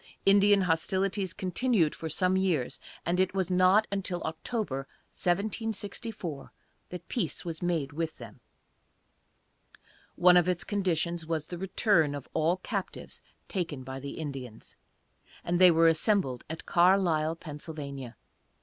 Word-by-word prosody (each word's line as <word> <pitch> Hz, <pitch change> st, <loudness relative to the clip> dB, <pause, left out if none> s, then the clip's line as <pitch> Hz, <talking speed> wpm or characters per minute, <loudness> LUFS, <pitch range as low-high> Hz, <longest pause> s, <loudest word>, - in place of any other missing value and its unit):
Indian 200 Hz, 0 st, +6 dB
hostilities 190 Hz, +2 st, 0 dB
continued 185 Hz, -1 st, +1 dB
for 160 Hz, -, -6 dB
some 185 Hz, +4 st, +1 dB
years, 180 Hz, -9 st, 0 dB, 0.3 s
and 175 Hz, +1 st, 0 dB
it 185 Hz, 0 st, +1 dB
was 190 Hz, -1 st, 0 dB
not 185 Hz, +4 st, +5 dB
until 190 Hz, -3 st, -2 dB
October, 160 Hz, -, -3 dB, 0.2 s
1764, 205 Hz, -, -3 dB, 0.4 s
that 180 Hz, -1 st, -8 dB
peace 195 Hz, -, -3 dB
was 165 Hz, -2 st, -5 dB
made 165 Hz, -6 st, -1 dB
with 160 Hz, +1 st, -3 dB
them. -, -, -11 dB, 1.8 s
One 180 Hz, 0 st, +6 dB
of 175 Hz, 0 st, +3 dB
its 180 Hz, -2 st, 0 dB
conditions 170 Hz, -4 st, -1 dB
was 160 Hz, -2 st, -2 dB
the 175 Hz, +1 st, -7 dB
return 185 Hz, -5 st, +2 dB
of 140 Hz, -, -7 dB
all 165 Hz, +3 st, +2 dB
captives 195 Hz, 0 st, -5 dB, 0.3 s
taken 165 Hz, -9 st, -3 dB
by 130 Hz, +1 st, -6 dB
the 140 Hz, +1 st, -6 dB
Indians, 135 Hz, -7 st, -7 dB, 0.7 s
and 175 Hz, +1 st, 0 dB
they 185 Hz, -, +10 dB
were 165 Hz, 0 st, +5 dB
assembled 165 Hz, -, +1 dB
at 160 Hz, 0 st, -6 dB
Carlisle, 170 Hz, -3 st, +3 dB
Pa. 155 Hz, -3 st, -9 dB
175 Hz, 130 wpm, -29 LUFS, 160-195 Hz, 1.8 s, they